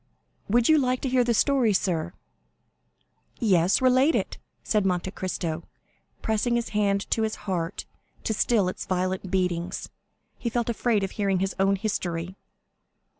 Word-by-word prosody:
"Would 235 +2 +3
you 315 -1 +6
like 255 -2 +1
to 265 - -1
hear 250 -1 +3
the 235 -1 +1
story, 255 -3 +3
sir?" 175 -3 -1 1.3
"Yes; 190 0 +3
relate 260 +5 +4
it," - - -2 0.2
said 210 -2 +1
Monte 185 -1 0
Cristo, 170 -4 -3 0.6
pressing 220 +2 +1
his 235 -1 -1
hand 200 -1 0
to 225 - +2
his 220 -1 0
heart 180 -2 -2 0.4
to 220 - 0
still 215 -2 +2
its 185 - -5
violent 185 0 -1
beatings; 180 -2 -1 0.5
he 235 - -2
felt 235 0 -1
afraid 230 -3 +1
of 195 - -2
hearing 200 -2 0
his 190 +1 -1
own 195 +1 +3
history. 180 -4 -3
200 Hz, 150 wpm, -26 LUFS, 185-235 Hz, 1.3 s, you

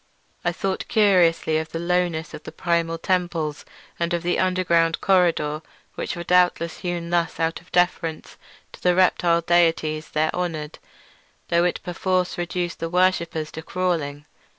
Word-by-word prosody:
I - - +1
thought 190 -1 -3
curiously 175 -6 +3
of 160 0 -5
the 165 - -5
lowness 170 -2 -1
of - - -8
the - - -9
primal 170 -1 0
temples 170 -4 -1 0.3
and 170 +1 0
of 170 - -4
the 175 +1 0
underground 170 -3 +2
corridor, 165 -5 +2 0.3
which - - -4
were 170 - -5
doubtless 175 -1 +2
hewn 175 -1 -4
thus 170 -1 0
out 165 +1 -1
of 175 - -24
deference 175 -2 0 0.4
to - - -14
the 180 -1 +3
reptile 175 -2 +3
deities 165 -2 +1
there 155 +1 0
honoured; 160 -4 -4 0.7
though 170 +1 +3
it 180 - -1
perforce 180 +1 -1
reduced 175 0 -3
the 165 - -3
worshippers 170 -3 +1
to 160 - -7
crawling. 160 -5 -2
170 Hz, 150 wpm, -23 LUFS, 165-180 Hz, 0.7 s, curiously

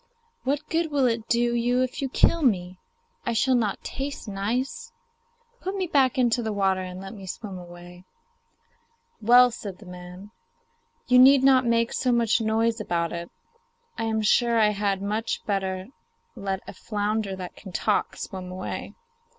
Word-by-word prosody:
What 285 +3 -1
good 330 0 0
will 285 -3 +2
it 230 -2 0
do 240 0 +2
you 245 +2 +2
if 255 - -4
you 270 - -1
kill 335 +5 +3
me 185 - 0 0.4
I - - -1
shall 260 +4 +2
not 220 -5 0
taste 275 -2 -5
nice? 250 - -3 0.7
Put 380 +2 -3
me 380 -2 -1
back 270 -6 +2
into 245 -1 +2
the 220 -2 -2
water 195 -2 +1
and 185 0 -7
let 195 +2 -8
me 195 -3 -10
swim 190 0 -6
away.' 175 +1 -12 1.2
'Well,' 245 +3 +7
said 205 -5 -7
the 210 - -15
man, 180 +2 -10 0.8
'you 250 0 +6
need 265 +1 +7
not 260 -2 +5
make 230 0 +2
so 255 - +1
much 235 -1 +2
noise 225 +1 +1
about 170 -4 -1
it; 170 0 -5 0.7
I 225 - -3
am 220 -1 0
sure 235 +2 +3
I 215 -1 +5
had 200 -2 -1
much 215 +3 -2
better 190 -2 -2 0.5
let 195 -1 -4
a - - -7
flounder 205 0 -2
that 185 -1 -8
can 190 - -11
talk 210 +4 0
swim 185 -2 -6
away. 185 0 -6
220 Hz, 165 wpm, -25 LUFS, 190-250 Hz, 1.2 s, Well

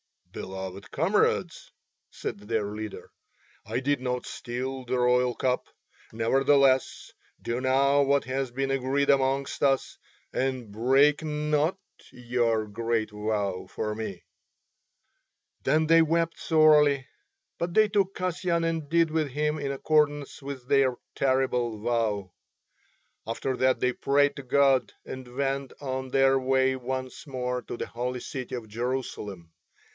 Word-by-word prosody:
"Beloved 95 0 -7
comrades," 175 +1 0 0.4
said - - -6
their 105 0 -2
leader, 105 0 -7 0.5
"I 125 - -2
did 140 +1 +1
not 125 -1 -2
steal 130 +2 -5
the 125 +1 -1
royal 125 0 +3
cup. 125 -1 0 0.5
Nevertheless 135 +3 +2 0.3
do 120 +1 -2
now 135 +2 +3
what 140 0 +3
has 130 0 -2
been 135 +2 -2
agreed 135 +1 0
amongst 135 0 0
us, 135 -1 +1 0.4
and 130 -4 -2
break 135 +8 +3
not 150 +2 0 0.3
your 120 -3 0
great 110 +1 -2
vow 105 -3 -2
for 105 -1 -3
me." 105 -4 -6 1.4
Then 155 +4 +3
they 165 +1 +6
wept 165 +1 +1
sorely, 150 -4 +4 0.5
but 170 0 -2
they 215 +1 +5
took 195 -1 +1
Kasyan 180 -2 -1
and 165 -3 -2
did 165 -1 +3
with 155 -1 +1
him 150 +3 -1
in 140 -1 -2
accordance 145 0 +1
with 135 -2 -7
their 135 -2 +3 0.2
terrible 125 -4 0
vow. 110 -4 -1 1.0
After 125 +3 -2
that 130 0 +2
they 125 - +3
prayed 140 +2 +2
to 140 - -6
God 135 0 +3
and 125 -1 -8
went 135 0 -1
on 130 -1 -3
their 135 0 +4
way 130 0 +2
once 130 +2 -5
more 125 -2 -2
to - - -6
the - - -3
holy 125 +1 -4
city 130 -2 -5
of 115 -3 -7
Jerusalem. 110 -7 -4
130 Hz, 130 wpm, -27 LUFS, 120-145 Hz, 1.4 s, they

